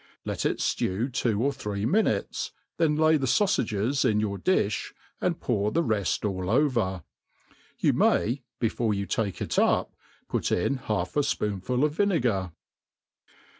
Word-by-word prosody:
Let - - -1
it - - -1
ftew 115 +8 -1
two 115 -3 0
or 140 +1 +1
three 105 -5 -4
minutes, 215 - 0 0.3
then 160 -3 +2
lay 155 +1 +4
the 135 -2 -1
faufages 130 - +1
in 110 -5 +2
your 100 -2 -2
difh^ 110 - 0 0.3
and 170 -1 0
pour 105 -7 0
the 170 - +1
reft 105 - 0
all 95 -2 -2
over. 115 - +1 0.7
You - - +2
mayy 125 +5 +2 0.2
before 115 -2 0
you 100 0 -2
take 100 -2 -2
it - - 0
up, - - +2 0.3
put - - -1
in 135 +10 +1
half 105 -8 -3
a - - +3
fpoonful 125 -2 -1
of 150 - 0
vinegar. 125 - +1
115 Hz, 150 wpm, -27 LUFS, 100-145 Hz, 0.7 s, lay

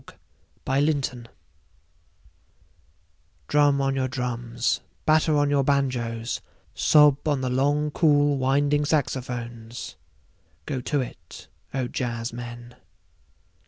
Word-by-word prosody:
Jazz - - -16 0.5
Fantasia 135 -3 0 2.2
DRUM 145 -1 +3
on 135 0 0
your 130 -1 0
drums, 120 -1 -2 0.2
batter 155 0 +3
on 145 0 +2
your 140 -1 +3
banjoes, 125 -4 -1 0.3
sob 150 -1 +4
on 145 -3 +1
the 130 -1 -1
long 145 +3 +1
cool 145 -2 +3
winding 145 +3 +2
saxophones. 120 -5 -3 0.7
Go 130 - -3
to 145 +3 0
it, 100 -9 -10 0.3
O 130 -2 -1
jazzmen. 120 0 -5
135 Hz, 95 wpm, -25 LUFS, 120-145 Hz, 2.2 s, sob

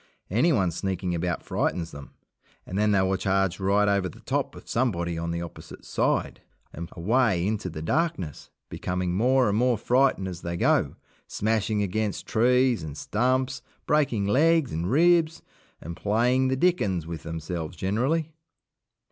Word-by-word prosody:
Anyone 115 - +2
sneaking 95 +1 -2
about 85 0 -2
frightens 85 -2 -2
them, 70 -1 -11 0.5
and 95 - -7
then 105 +1 +2
they 100 -2 +3
will 95 0 +1
charge 95 -1 0
right 100 +2 +2
over 100 -2 +1
the - - -14
top - - -2
of - - -13
somebody 85 -9 0
on 85 0 -3
the 85 0 -2
opposite 85 - -11
side, - - -1 0.3
and 85 +1 -7
away 100 0 +1
into 105 -2 -2
the 80 -2 -7
darkness, 115 - -2 0.2
becoming 90 -1 -3
more 125 +5 +3
and 105 +1 +1
more 125 -1 +2
frightened 125 -4 +2
as 90 -2 -7
they 85 0 -4
go, - - +2 0.3
smashing 110 -1 0
against 105 +1 -2
trees 125 0 +3
and 75 -2 -7
stumps, 130 +3 0 0.2
breaking 135 -9 +1
legs 155 +6 +3
and 85 +3 -2
ribs, 165 +3 +3 0.4
and 85 +2 -7
playing 120 +7 +2
the 130 0 0
dickens 105 - +1
with 85 -1 -6
themselves 80 0 -5
generally. 135 - 0
100 Hz, 155 wpm, -26 LUFS, 90-125 Hz, 0.5 s, they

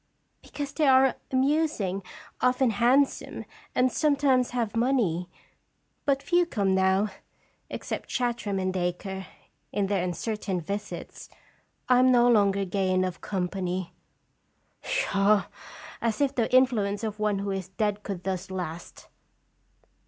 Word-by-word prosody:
"Because 285 -1 -6
they 305 -3 +2
are 265 0 +6 0.2
amusing, 265 - +1 0.4
often 250 -1 +3
hand 245 +6 +4
some, - - -8 0.3
and 255 0 +3
sometimes 280 -4 +2
have 230 -4 -2
money. 225 -9 +1 0.8
But 275 -2 +1
few 350 -1 +2
come 200 - 0
now, 190 +2 +2 0.6
except - - -5
Chartram 235 -5 -1
and 185 0 -1
Dacre, 185 +1 -3 0.4
in 205 - 0
their 195 -2 0
uncertain 190 +1 -2
visits. 200 +5 -6 0.6
I 250 -1 +5
am 255 0 +5
no 240 -1 +5
longer 200 -4 +3
gay 190 0 -1
enough 185 -1 0
company." 185 -1 -3 0.4
" - - -44
Pshaw! 205 - +2 0.6
as 230 -2 -1
if 280 -1 +2
the 235 -4 0
influence 235 -5 +3
of 215 -1 -4
one 210 -1 +1
who 200 0 -2
is 190 -2 -3
dead 210 +1 -1
could 195 -4 -6
thus 190 0 -3
last!" 175 -3 -6
210 Hz, 130 wpm, -27 LUFS, 190-255 Hz, 0.8 s, are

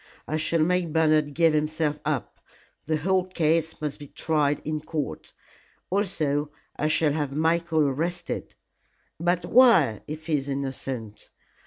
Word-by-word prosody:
"I 155 - -2
shall 155 +1 +1
make 180 0 +1
Bernard 155 -2 +2
give 165 -1 +4
himself 155 0 0
up. 145 -5 -2 0.5
The 155 0 0
whole 185 +4 +1
case 160 -3 0
must 150 -2 -4
be 145 - -9
tried 150 -1 0
in 155 0 -2
court. 150 - -5 0.6
Also 155 -7 0 0.3
I 150 - 0
shall 155 -1 +2
have 145 -3 -2
Michael 165 +1 +1
arrested." 165 +6 -3 0.6
"But 175 +1 +1
why, 190 - +5
if 155 +1 -7
he 155 -2 +1
is 135 +1 -7
innocent?" 135 -5 -5
155 Hz, 140 wpm, -26 LUFS, 145-165 Hz, 0.6 s, why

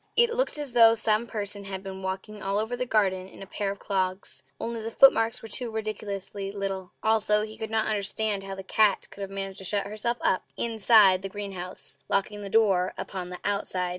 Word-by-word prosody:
It 475 0 +4
looked - - -1
as 290 -3 -4
though 230 -1 +7
some 220 +1 +1
person 205 -2 -5
had 190 -1 -6
been 190 -1 -7
walking 190 +3 -5
all 195 +1 -1
over 220 +3 -1
the 250 +1 -3
garden 190 -4 +1
in - - -11
a - - -9
pair 200 +1 -3
of 200 - -4
clogs 190 -1 0 0.2
only 230 -1 -4
the 225 - -4
footmarks 230 -1 +4
were - - -7
too 235 +3 +7
ridiculously 205 -2 -5
little! 195 -2 -4
Also 215 -1 +3
he 215 0 -7
could 220 - -6
not 220 0 0
understand 210 -1 +1
how 195 0 -6
the 195 - -8
cat 205 +1 +2
could 200 - -11
have 195 - -4
managed 195 0 -5
to - - -9
shut 200 +1 -1
herself 215 +4 -2
up 185 - +1
INSIDE 220 -4 +4
the 195 - -5
greenhouse, 190 -3 -6
locking 205 +1 -1
the 200 - -6
door 195 -4 +2
upon 185 -2 -5
the 180 - -7
OUTSIDE. 190 -3 -1
205 Hz, 210 wpm, -26 LUFS, 195-220 Hz, 0.2 s, though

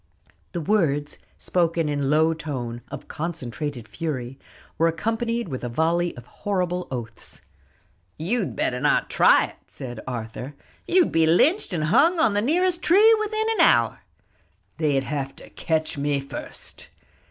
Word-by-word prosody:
The 170 - -2
words, 150 -6 0 0.2
spoken 170 -2 0
in 145 -2 -1
low 160 +2 +4
tone, 130 -7 -5
of - - -8
concentrated 145 -6 -5
fury, 135 -4 -5 0.4
were 165 - +4
accompanied 225 +6 -1
with 130 -5 -5
a 120 - -2
volley 170 +6 0
of 120 - -10
horrible 180 +3 -2
oaths. 115 -4 -6 0.8
"You'd 190 +5 -1
better 125 - -1
not - - +2
try - - +5
it!" - - -13
said 120 -3 -8
Arthur; 125 +3 -6 0.3
"you'd 360 -1 +4
be 165 0 +3
lynched 305 - +3
and 165 -4 -1
hung 320 - +4
on 315 -10 +3
the 205 - +1
nearest 350 - +1
tree 425 +7 +6
within 435 0 -1
an - - +1
hour." - - +4 0.8
"They'd 145 -4 +2
have 135 +1 -4
to - - -14
catch 160 -3 -1
me 145 0 0
first." 135 - -9
160 Hz, 145 wpm, -24 LUFS, 135-205 Hz, 0.8 s, tree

